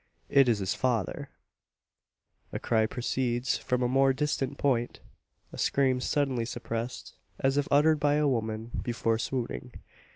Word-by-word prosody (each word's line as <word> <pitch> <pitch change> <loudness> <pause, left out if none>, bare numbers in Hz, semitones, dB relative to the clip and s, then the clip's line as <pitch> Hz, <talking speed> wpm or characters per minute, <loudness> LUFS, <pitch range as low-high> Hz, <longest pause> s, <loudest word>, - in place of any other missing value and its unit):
It 135 -2 +5
is 115 - +3
his 95 -2 -1
father! 120 -8 -1 1.2
A - - -3
cry 110 -2 +1
proceeds 125 +1 -1
from 125 0 -1
a - - +2
more 135 +1 +3
distant 140 -1 -1
point 120 -4 0 0.5
a - - -8
scream 130 -2 +2
suddenly 135 -4 0
suppressed, 115 +1 -5 0.2
as 135 0 +1
if 145 0 +1
uttered 150 +2 +4
by 145 0 +3
a 150 0 +2
woman 110 -2 -2
before 115 -2 0
swooning. 125 0 -4
125 Hz, 140 wpm, -29 LUFS, 115-135 Hz, 1.2 s, It